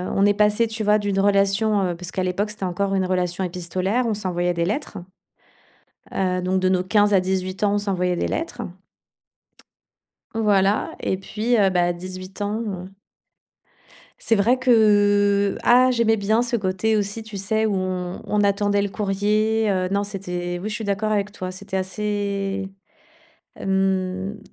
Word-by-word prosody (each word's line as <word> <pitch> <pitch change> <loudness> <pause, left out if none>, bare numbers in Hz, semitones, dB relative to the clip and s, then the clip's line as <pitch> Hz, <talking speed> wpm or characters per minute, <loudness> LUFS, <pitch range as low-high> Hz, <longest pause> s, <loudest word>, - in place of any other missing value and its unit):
on 195 - +4
est 205 - +4
passées, 210 +2 +2
tu 220 0 -4
vois? 210 0 +4
D'une 200 -1 -1
relation, 200 +1 +2
heu 175 -2 -1
parce 180 0 -7
qu'à 185 - -2
l'époque, 195 +3 -1
c'était 210 -2 -8
encore 195 +2 -1
une 190 -1 +1
relation 180 0 -1
épistolaire, 185 +6 -1
on 220 - 0
s'envoyait 180 -3 -1
des 170 0 -1
lettres. 210 - -3 1.1
Heu, 185 -1 0
donc 185 +1 0
de 185 - +2
nos 185 -1 +2
15 205 +2 +3
à 190 - +5
18 185 +1 -2
ans, 205 0 +2
on - - +2
s'envoyait 180 -3 -1
des - - -1
lettres. 315 -7 -4 1.7
Voilà, 205 -2 +2
et 190 - -1
puis, 220 +5 -1
heu, 195 -3 +4
bah, 175 -1 +2
18 185 +2 -9
ans. 205 -3 -3 1.3
C'est 225 - +1
vrai 230 +5 +3
que 205 -4 +3
ah, 255 +1 +5
j'aimais 230 -2 +2
bien 215 +3 +1
ce 245 0 -1
côté 205 +2 0
aussi, 205 +2 -2
tu 215 -2 -9
sais, 220 +3 0
où 205 - 0
on 185 -1 -3
on 210 0 0
attendait 205 0 +2
le 200 - 0
courrier, 210 +2 0
heu, 185 -1 0
non, 200 +1 0
c'était 180 -3 -4
oui, 215 - -3
je - - -4
suis 225 - -4
d'accord 205 +2 -1
avec 205 0 -1
toi, 185 -2 -5
c'était 190 +1 -6
assez 200 0 -2 0.9
hem, 190 +1 -1
200 Hz, 165 wpm, -22 LUFS, 185-210 Hz, 1.7 s, à